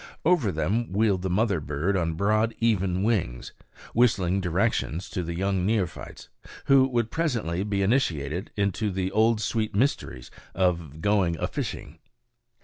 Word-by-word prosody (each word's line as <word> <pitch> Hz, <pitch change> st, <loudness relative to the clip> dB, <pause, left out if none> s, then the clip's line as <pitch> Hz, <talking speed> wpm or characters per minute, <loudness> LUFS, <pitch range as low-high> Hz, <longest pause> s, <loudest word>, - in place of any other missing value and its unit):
Over 155 Hz, -, +3 dB
them 105 Hz, +8 st, -1 dB
wheeled 100 Hz, -2 st, +2 dB
the 95 Hz, -, -2 dB
mother 100 Hz, 0 st, +1 dB
bird 75 Hz, +6 st, -1 dB
on 85 Hz, -3 st, 0 dB
broad, 110 Hz, +5 st, +1 dB
even 95 Hz, -5 st, +1 dB
wings, 95 Hz, -, -1 dB, 0.4 s
whistling 100 Hz, -6 st, +2 dB
directions 90 Hz, -1 st, -1 dB
to 90 Hz, -, -2 dB
the 85 Hz, 0 st, -4 dB
young 95 Hz, 0 st, 0 dB
neophytes, 100 Hz, -3 st, -2 dB, 0.4 s
who 135 Hz, -1 st, +5 dB
would 120 Hz, -3 st, -1 dB
presently 115 Hz, -, -1 dB
be 100 Hz, -1 st, -1 dB
initiated 90 Hz, -, 0 dB
into 100 Hz, +1 st, 0 dB
the 95 Hz, -1 st, -2 dB
old 110 Hz, +2 st, +3 dB
sweet 110 Hz, -2 st, -1 dB
mysteries 100 Hz, -, -1 dB, 0.2 s
of 85 Hz, -5 st, -1 dB
going 95 Hz, -4 st, +2 dB
a -, -, -1 dB
fishing. -, -, -5 dB
100 Hz, 140 wpm, -26 LUFS, 90-110 Hz, 0.4 s, who